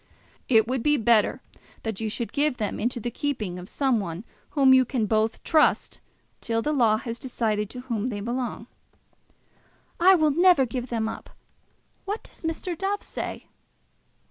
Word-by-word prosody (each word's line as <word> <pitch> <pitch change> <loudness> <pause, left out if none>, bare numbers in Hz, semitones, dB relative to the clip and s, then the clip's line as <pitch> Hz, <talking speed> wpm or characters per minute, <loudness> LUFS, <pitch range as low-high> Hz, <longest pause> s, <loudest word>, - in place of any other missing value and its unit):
"It 225 -3 +5
will 255 +1 0
be 295 +5 +2
better 225 -2 +3 0.4
that 220 -2 -4
you 220 - -1
should 230 +2 -4
give 290 -2 +1
them 210 -3 -3
into 240 +2 -1
the 240 +2 -4
keeping 215 -11 -3
of 180 - -9
some 265 -5 +1
one 175 -1 -5 0.3
whom 270 -2 +5
you 260 0 +6
can 245 -3 -1
both 220 +1 0
trust, 310 -2 +2 0.4
till 225 -1 -1
the 300 - 0
law 230 -6 +3
has 230 +1 -5
decided 215 -5 -1
to 250 - -7
whom 235 -3 -2
they 215 -5 -3
belong." 240 +1 -3 1.3
"I 375 +2 +7
will 310 -3 +3
never 345 -2 +5
give 245 +1 -4
them 225 -3 -1
up. - - -7 0.8
What 410 +3 -4
does - - -16
Mr. 325 +2 -3
Dove 395 +4 -2
say?" - - -6
240 Hz, 170 wpm, -25 LUFS, 220-285 Hz, 1.3 s, I